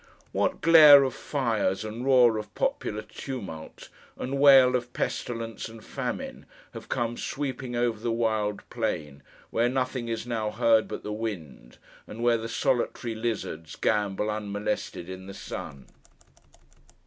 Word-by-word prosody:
What - - 0
glare 150 -3 +9
of 130 - -1
fires, 110 -7 -1
and 110 +3 -5
roar 125 -4 +5
of 105 -1 -9
popular 105 +1 -1
tumult, 105 - -8 0.3
and 135 +2 -3
wail 135 -3 +7
of 125 0 -3
pestilence 115 -2 -3
and 115 -1 -13
famine, - - -5 0.3
have - - -10
come 120 0 -1
sweeping 130 -3 -4
over 120 -2 0
the 115 +1 -2
wild 110 -3 -1
plain 80 - -3 0.3
where 120 +2 +2
nothing 130 -1 -2
is 115 0 -3
now 115 -3 -2
heard 115 0 +3
but - - -6
the 105 - -4
wind, 85 - -6 0.3
and 115 +2 -7
where 120 -1 +3
the 115 +1 -5
solitary 120 -1 -1
lizards 110 -8 -4
gambol 105 0 0
unmolested 105 -4 -3
in 95 0 -8
the 100 - -8
sun! 70 -7 -7
115 Hz, 140 wpm, -27 LUFS, 105-125 Hz, 0.3 s, glare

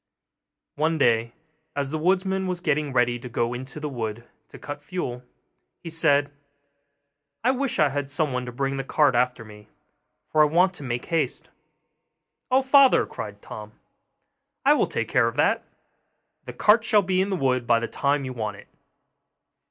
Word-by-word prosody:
One 160 +2 +1
day, 115 -4 +2 0.4
as 140 -1 -2
the 155 - -2
woodman 190 +2 +1
was 180 -1 -2
getting 150 -4 0
ready 120 -1 +1
to 125 +1 -8
go 120 0 -1
into 130 +4 -7
the 150 - -4
wood 115 -3 -5 0.2
to - - -13
cut 145 0 -7
fuel, 145 -7 -5 0.6
he 165 - -9
said, 145 -3 +2 1.1
'I 250 - +4
wish 265 -1 -1
I 150 -2 +4
had 140 0 -3
someone 140 -4 -1
to - - -5
bring 135 +2 -2
the 135 - -2
cart 145 0 +2
after 125 -1 0
me, 105 0 -14 0.6
for 155 - +4
I - - +7
want 180 +5 +3
to 175 - -9
make 120 -3 -4
haste.' 165 -2 -2 1.0
'Oh, 260 +1 +3
father,' 270 0 +5
cried 105 -1 -8
Tom, 105 0 -9 0.9
'I - - +7
will - - +2
take - - -2
care - - +3
of - - -3
that; - - +2 0.8
the - - -7
cart 225 +3 +4
shall 210 -2 +3
be 185 0 +1
in 195 - -1
the 195 - 0
wood 130 -6 0
by 115 - +5
the 115 - -3
time 140 +2 0
you 130 - -5
want 105 -4 -4
it. - - -15
145 Hz, 175 wpm, -24 LUFS, 120-175 Hz, 1.1 s, I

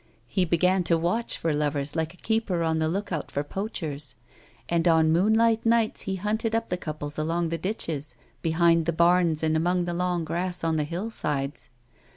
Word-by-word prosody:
He 180 +10 0
began 180 +2 +2
to 170 - +3
watch 180 +8 0
for 165 -2 -1
lovers 145 -1 -1
like 160 -1 -1
a - - -23
keeper 220 -6 0
on 160 -1 +1
the 160 - +1
look 195 +4 -3
out 165 -4 -3
for 145 - -2
poachei's, 150 - -5 0.5
and 170 0 +1
on 160 -1 +4
moonlight 220 +6 +3
nights 230 -1 +2
he 190 - -1
h^mted 220 +3 -1
up 230 0 -1
the 180 - 0
couples 155 -3 -5
along 165 +2 0
the 165 0 -2
ditches, 160 -6 -3 0.3
behind 165 0 +3
the 170 - +1
barns 170 -1 +3
and 160 0 +2
amongst 175 +2 +1
the 175 - -2
long 175 -1 -1
grass 180 +2 -1
on 165 -1 +1
the 150 - 0
hill 180 +8 -4
sides. 145 -7 -3
170 Hz, 190 wpm, -26 LUFS, 160-185 Hz, 0.5 s, on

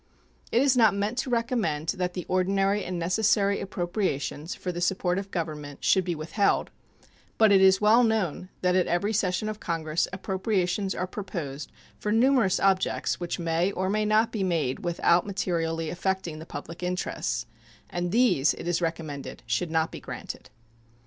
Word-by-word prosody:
It 240 - +4
is 275 -2 +4
not 220 -5 +5
meant 210 +5 -1
to 260 - -2
recommend 230 - 0
that 180 -2 -1
the 180 - -4
ordinary 195 +2 +1
and 180 0 -4
necessary 200 +3 +2
appropriations 175 -5 -2
for 180 - -4
the 175 0 -5
support 180 0 +1
of 195 0 -7
Government 150 -5 -5
should 190 - +4
be 175 -1 -2
withheld; 165 +7 0 0.7
but 220 -2 +5
it 195 -1 +6
is 190 0 +6
well 220 +4 +6
known 205 -6 0
that 180 0 +2
at 185 - +3
every 200 +5 0
session 195 0 0
of 215 0 -4
Congress 165 -1 -1
appropriations 190 0 -1
are 185 - -1
proposed 170 -8 -6 0.3
for 210 - -2
numerous 230 -3 +3
objects 190 -1 +1
which 175 -1 -3
may 170 +2 0
or 190 +1 -1
may 215 +1 +1
not 215 +2 +3
be 210 -4 -2
made 165 -8 0
without 170 +1 +2
materially 165 -4 -1
affecting 180 -3 -2
the 160 - -10
public 165 +1 -8
interests, 180 0 -2 0.4
and 175 0 -3
these 205 - +3
it - - -7
is 175 0 0
recommended 160 -6 -4
should 115 +10 -1
not 160 0 +1
be - - -7
granted. - - -8
185 Hz, 170 wpm, -27 LUFS, 170-205 Hz, 0.7 s, it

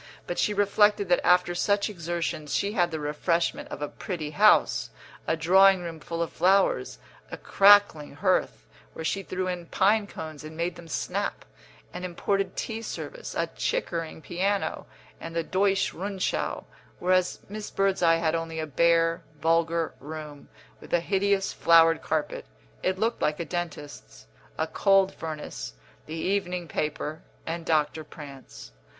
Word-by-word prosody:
But 175 - -4
she - - +2
reflected 205 -1 +3
that 175 - +3
after 180 0 +4
such 200 +3 +1
exertions 170 -5 -3
she 200 - 0
had 175 -5 +2
the 160 -2 -4
refreshment 155 +3 -1
of 145 - -6
a - - -1
pretty 160 -4 -5
house, 60 - +4 0.4
a 165 - +1
drawing 190 +3 +5
room 165 -2 -6
full 165 +2 -3
of 165 - -6
flowers, 195 +2 +2 0.3
a - - -6
crackling 200 -7 +4
hearth, 60 - 0 0.3
where 160 - -6
she 195 - 0
threw 185 -1 -3
in 175 -2 -4
pine 205 +4 +2
cones 155 -5 -8
and 155 +1 -9
made 170 +1 -1
them 170 - -12
snap, 160 - -3 0.5
an 180 - -6
imported 185 +2 -1
tea 225 -1 -4
service, - - -7
a - - +1
Chickering 165 - -2
piano, 195 +5 -1 0.3
and 165 0 -8
the 165 - 0
Deutsche 195 +3 +1
Rundschau; 190 +1 -2 0.3
whereas 185 0 +1
Miss 210 +1 -6
Birdseye 185 -4 +2
had 160 -1 0
only 165 -1 -3
a 160 - -2
bare, 165 +3 +2 0.2
vulgar 165 0 +1
room, 150 -1 -9 0.3
with - - -14
a - - +3
hideous 195 +2 +1
flowered 165 -1 +5
carpet 155 -1 -2 0.3
(it 185 0 0
looked 225 +4 -1
like 150 +1 0
a 170 - -2
dentist's), 145 - -6 0.3
a 160 - +1
cold 195 +3 +3
furnace, 155 - -6 0.3
the 155 - -6
evening 180 0 -1
paper, 150 0 -3 0.2
and 165 0 -5
Doctor 155 0 +1
Prance. 140 - -11
170 Hz, 150 wpm, -27 LUFS, 160-195 Hz, 0.5 s, drawing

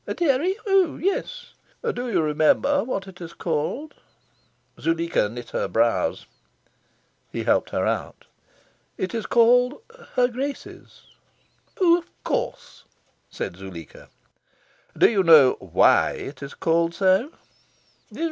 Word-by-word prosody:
"A - - -3
dairy? 340 +3 +1
Oh 390 -5 +2
yes." 485 +6 -3 0.4
"Do 245 0 -4
you 180 -7 +1
remember 155 - +2
what 195 -6 -4
it 180 -2 -13
is 170 -1 -8
called?" 170 - -3 0.9
Zuleika 165 -9 0
knit 120 +2 -9
her - - -1
brows. 115 +5 0 1.1
He - - -4
helped - - +1
her - - -1
out. - - -3 0.7
"It 185 - -3
is 225 -2 -3
called 245 +3 +4 0.4
'Her 250 -1 +4
Grace's'." 270 +3 -7 0.8
"Oh, 345 -2 +5
of 340 - -17
course!" - - -4 0.5
said 85 - -6
Zuleika. 95 -4 -11 0.9
"Do - - +6
you 205 -4 +2
know 155 -7 +7
WHY - - +3
it 145 - -8
is 140 0 -8
called 165 +1 0
so?" 195 - +2
195 Hz, 120 wpm, -23 LUFS, -, 1.1 s, know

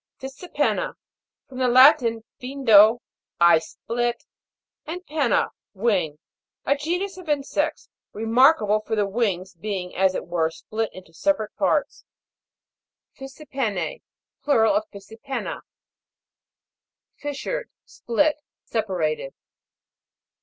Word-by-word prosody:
FISSJPEN'NA. 270 - -2 0.5
From 260 -2 -9
the 255 - +2
Latin, 245 -3 +6 0.2
Jindo, 240 -4 +5 0.4
I 170 -1 +6
split, 240 +7 -3 0.6
and 360 +3 -6
penna, 295 -5 +1 0.3
wing. 190 -8 0 0.5
A 280 - +3
genus 355 +7 -3
of 345 -4 -11
insects, 295 +2 -1 0.2
remarkable 225 -1 +3
for 220 +1 -3
the 210 -1 +1
wings 195 -3 -1
being 180 0 -5
as 190 0 +2
it - - -3
were 165 -2 0
split 215 +6 -4
into 185 -3 -13
separate 220 - -1
parts. - - 0 1.1
FISSIPEN'N*:. 265 - -4 0.4
Plural 235 -4 +3
of 315 +1 0
Fissipenna. 225 +6 -6 1.6
FIS'SURED. 290 - -4 0.2
Split, 295 +7 0 0.3
separated. 175 -10 -2
235 Hz, 95 wpm, -24 LUFS, 200-285 Hz, 1.6 s, Latin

